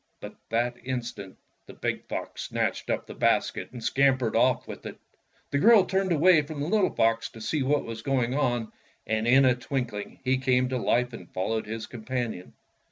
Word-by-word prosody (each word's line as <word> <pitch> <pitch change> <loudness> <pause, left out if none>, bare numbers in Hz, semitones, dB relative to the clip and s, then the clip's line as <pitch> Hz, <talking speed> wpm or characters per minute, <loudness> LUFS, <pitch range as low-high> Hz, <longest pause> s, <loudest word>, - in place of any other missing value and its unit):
But - - -9
that 120 +2 0
instant 120 -6 -5 0.3
the - - -11
big - - -3
fox - - -5
snatched - - -2
up - - -1
the - - -9
basket - - 0
and 125 - -8
scam 135 +2 +3
pered 115 -4 -2
off 125 +2 +2
with - - -8
it. - - -9 0.5
The 140 - +1
girl 215 +1 +7
turned 190 -1 0
away 165 0 +5
from 150 0 -7
the 145 - -1
little 210 +1 +3
fox 115 0 +1
to 115 - -13
see 140 +7 -1
what 145 +2 +1
was 115 -1 -6
going 125 -1 0
on, 120 -5 0 0.3
and 110 +1 -1
in 130 +2 +6
a 130 - +5
twinkhng 125 -4 -4
he 130 0 +2
came 130 -1 +2
to 130 -1 -1
hfe 125 +1 +1
and 90 -6 -10
followed 110 +4 -2
his 110 0 -5
companion. 120 -5 -5
125 Hz, 195 wpm, -27 LUFS, 115-140 Hz, 0.5 s, girl